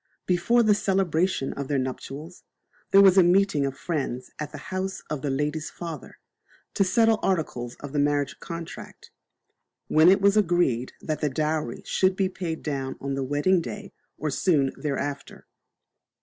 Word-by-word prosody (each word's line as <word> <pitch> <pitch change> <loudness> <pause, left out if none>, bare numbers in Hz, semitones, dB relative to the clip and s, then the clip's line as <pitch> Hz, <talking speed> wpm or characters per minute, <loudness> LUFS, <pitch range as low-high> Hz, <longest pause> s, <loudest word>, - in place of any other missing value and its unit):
Before 210 +7 +3
the 215 -1 +5
celebration 190 -7 0
of 140 -1 -5
their 145 - 0
nuptials, 135 +5 -5 0.5
there 195 - +7
was 190 0 +7
a - - +7
meeting 175 -5 +3
of 135 -1 -6
friends 130 -5 -3
at 150 -1 -4
the 150 - -8 0.2
house 190 +1 -3
of 150 -3 -2
the 145 - -2
lady's 150 +3 -2
father, 165 -5 -8 0.6
to - - +3
settle 225 +3 +3
articles 135 -10 -1
of 145 -1 -8
the 145 - +1
marriage 145 -1 0
contract, 170 -1 -9 0.8
when 155 +3 +6
it 195 +2 +5
was 200 +1 +4
agreed 175 - +1
that 155 -1 -3
the 150 - +1
dowry 150 -2 -2
should 185 0 +2
be 190 -1 +1
paid 170 -4 -5
down 135 -3 -3
on 140 0 -3
the 135 0 -2
wedding 145 +7 +2
day 115 -8 -7 0.2
or 150 0 -2
soon 140 -4 +2 0.2
after. 140 0 -4
155 Hz, 165 wpm, -25 LUFS, 140-185 Hz, 0.8 s, there